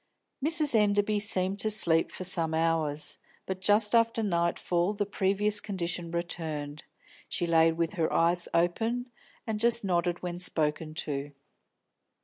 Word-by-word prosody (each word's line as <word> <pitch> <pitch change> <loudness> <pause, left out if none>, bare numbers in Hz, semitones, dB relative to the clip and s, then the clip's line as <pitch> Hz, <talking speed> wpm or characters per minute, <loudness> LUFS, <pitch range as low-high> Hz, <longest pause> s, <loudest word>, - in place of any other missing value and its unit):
Mrs. 310 -2 +3
Enderby 210 -1 +2
seemed 195 -2 +1
to 215 - +2
sleep 170 -6 +3
for - - -7
some 165 -3 +3
hours, 160 -2 -1 0.3
but 190 0 -5
just 210 +2 +2
after 230 -1 +2
nightfall 175 0 0
the 205 0 -2
previous 205 +1 +1
condition 175 -4 -4
returned; 160 -3 -5 0.5
she 175 - -1
lay 165 -1 +4
with 165 +1 -2
her 165 -5 -1
eyes 170 +1 +1
open, 225 +9 -1 0.3
and 220 -2 -3
just 235 0 +3
nodded 175 -1 -1
when 175 -1 -5
spoken 155 -2 0
to. 145 -2 -4
175 Hz, 135 wpm, -28 LUFS, 165-210 Hz, 0.5 s, lay